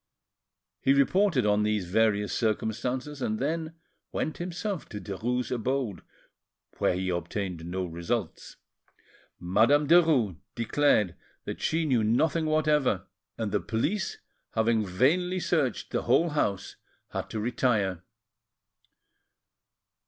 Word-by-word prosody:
He 135 - +4
reported 140 - +3
on 105 0 +3
these 105 -2 0
various 105 +2 +1
circumstances, 125 +5 -2
and 110 -3 -1
then 160 +4 -2 0.4
went 155 - -3
himself 180 +2 -4
to 105 - -6
Derues' 120 +5 -3
abode, 125 -3 -1 0.8
where - - +2
he 95 +1 -2
obtained 90 -1 -3
no 90 +1 -2
results. 85 +3 -4 0.8
Madame 115 +12 +3
Derues 150 - +4 0.2
declared 115 -5 +2 0.3
that - - -5
she 160 0 +1
knew 125 -7 +2
nothing 155 +9 +2
whatever, 150 - +2 0.3
and 110 -3 -2
the 105 - +2
police, 155 - -2 0.4
having 110 0 +2
vainly 165 - +1
searched 150 -9 0
the - - 0
whole 170 - +3
house, 100 -10 -1 0.3
had - - -4
to 110 - -4
retire. 105 -6 0
115 Hz, 115 wpm, -28 LUFS, 105-150 Hz, 0.8 s, He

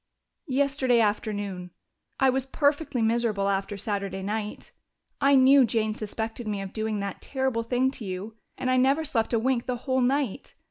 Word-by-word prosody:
"Yesterday 270 -3 +2
afternoon. 205 -4 -1 0.5
I 265 -1 +5
was 265 0 -1
perfectly 285 -2 +1
miserable 220 -3 +1
after 195 +1 -1
Saturday 200 -1 -3
night. 210 +1 -4 0.5
I 280 0 +5
knew 265 +1 +7
Jane 220 -2 0
suspected 220 +2 -5
me 205 -1 -2
of 195 -1 -6
doing 220 -2 -2
that 200 -1 -5
terrible 265 -4 -1
thing 250 +3 +1
to 235 - -7
you, 190 +4 -5 0.2
and 255 - -1
I 255 - +3
never 275 +5 +3
slept 230 -7 0
a 235 - +3
wink 240 +1 0
the 250 - 0
whole 260 -1 +1
night. 270 -1 -1
230 Hz, 170 wpm, -26 LUFS, 210-265 Hz, 0.5 s, knew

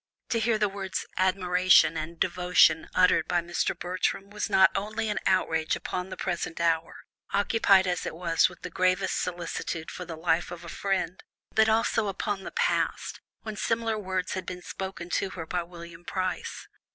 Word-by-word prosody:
To 230 - +1
hear 225 0 +2
the 210 -1 +2
words 195 -1 -4
"admiration" 185 -3 +4
and 160 +1 -5
"devotion" 180 -2 +3
uttered 185 0 +4
by 175 - +2
Mr. 175 0 -1
Bertram 185 +2 -2
was 210 +1 -3
not 190 -1 +6
only 215 +2 -2
an 210 -4 -1
outrage 160 -4 +2
upon 180 +1 -4
the 185 - -7
present 170 -1 -3
hour, 165 -1 +1 0.4
occupied 200 -1 +4
as 180 -2 -1
it - - -5
was 165 0 +2
with 175 - -16
the 180 - -5
gravest 185 +2 +1
solicitude 170 -2 -4
for 180 - -6
the 165 -2 -7
life 165 +1 +1
of 175 -1 -8
a - - -7
friend, 190 -2 -2 0.3
but 220 0 +4
also 225 0 +2
upon 200 0 -2
the - - -6
past, - - -1 0.2
when 215 -1 -5
similar 225 0 0
words 185 -2 -2
had 185 - -4
been 180 -1 -6
spoken 190 -2 -6
to 195 - 0
her 165 - -4
by 175 +2 -1
William 170 0 -11
Price. 185 +1 -3
185 Hz, 175 wpm, -27 LUFS, 170-195 Hz, 0.4 s, not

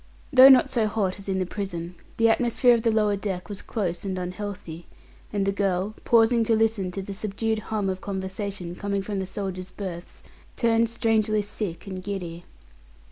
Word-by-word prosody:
Though 260 +1 +10
not 265 0 +6
so 230 -4 +2
hot 205 -3 -1
as 200 - -7
in 190 - 0
the 185 - 0
prison, 180 -3 -5 0.2
the 230 - +4
atmosphere 240 +2 +4
of 235 - +2
the 230 - +2
lower 210 -2 +2
deck 190 -2 -4
was 205 -2 -6
close 180 -6 -3
and 190 -2 -3
unhealthy, 180 -2 -6 0.4
and 200 -2 0
the 195 - +2
girl, 195 0 0
pausing 230 0 +4
to 225 - +3
listen 220 -4 +1
to 195 - -4
the 200 - -6
subdued 215 +2 -2
hum 210 -3 -1
of 185 -1 -2
conversation 190 -2 -4
coming 200 0 -2
from 200 -1 -3
the 190 - -3
soldiers' 185 -2 -5
berths, 180 -4 -7 0.3
turned 230 -1 +2
strangely 220 -2 +1
sick 205 -4 -5
and 190 -2 -6
giddy. 180 -3 -5
200 Hz, 185 wpm, -25 LUFS, 185-220 Hz, 0.4 s, Though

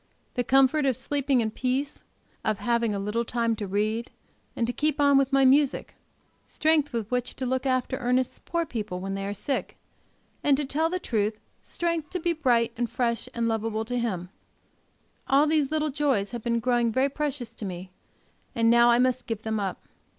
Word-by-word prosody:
The 245 - 0
comfort 270 +3 +4
of 255 -3 +1
sleeping 275 -1 +1
in 220 -1 -1
peace, 260 +5 -2 0.4
of 215 -1 0
having 235 -1 +1
a 205 - -2
little 210 +4 -1
time 230 -1 0
to 205 - -4
read, 215 +4 -1 0.5
and 235 - 0
to 245 - -2
keep 305 +2 0
on 285 -1 +5
with 275 0 +3
my 270 0 +4
music; 275 +1 +3 0.5
strength 310 -2 +2
with 230 -3 -3
which 250 0 -1
to 260 - -3
look 260 +1 -1
after 255 0 0
Ernest's 250 0 0
poor 335 0 -1
people 215 - -4
when 195 +1 -4
they 195 0 -3
are 200 - -2
sick; 265 +7 -3 0.7
and, 280 -2 +4
to 295 - -1
tell 310 +4 0
the 365 - -1
truth, 215 - -1 0.2
strength 335 -3 -2
to 365 - -3
be 345 0 0
bright 240 -7 +2
and 240 -1 -2
fresh 235 0 -1
and 235 -1 0
lovable 225 0 -1
to 245 +2 -2
him 185 -7 -2 1.0
all 275 +2 +5
these 305 -3 +2
little 310 -1 0
joys 265 -9 0
have 240 -1 -5
been 235 0 0
growing 240 -1 +1
very 260 +4 +2
precious 280 -4 -3
to 225 - -9
me, 185 -1 -6 0.6
and 230 0 +4
now 235 0 +6
I 235 - +5
must 255 0 +1
give 225 -2 -4
them 220 -1 -1
up. 195 -2 -4
245 Hz, 195 wpm, -26 LUFS, 225-275 Hz, 1.0 s, now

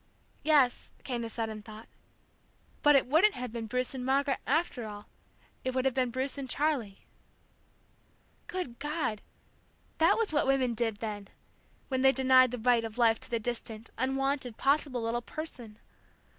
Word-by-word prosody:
Yes, 285 -5 +2
came 245 -3 -3
the 230 - -4
sudden 220 -2 -4
thought, 215 +1 -11 0.9
but 295 0 +6
it 275 - +4
wouldn't 325 +11 +4
have 250 -2 -5
been 230 -2 -4
Bruce 250 +3 -2
and 260 -2 -5
Margaret, 275 +2 +1
after 280 -6 0
all, 205 -1 -9 0.6
it 260 0 -2
would 260 0 0
have 265 - +2
been 255 -1 +1
Bruce 260 +3 -2
and 265 -2 -6
Charlie. 260 -10 -1 1.4
Good 355 -11 -5
God! 295 -8 -2 0.8
That 325 - +5
was 450 -7 0
what 290 - +2
women 265 -3 +2
did, 225 -1 -1
then, 205 -3 -4 0.6
when 260 -1 0
they 265 0 +6
denied 260 -1 +5
the 250 - -4
right 235 0 +3
of 225 0 -6
life 230 -2 +4
to - - -10
the 235 -1 0
distant, 225 -1 -5
unwanted, 265 -1 -1
possible 275 -3 +1
little 235 +1 -1
person! 245 -7 -8
255 Hz, 160 wpm, -30 LUFS, 230-275 Hz, 1.4 s, but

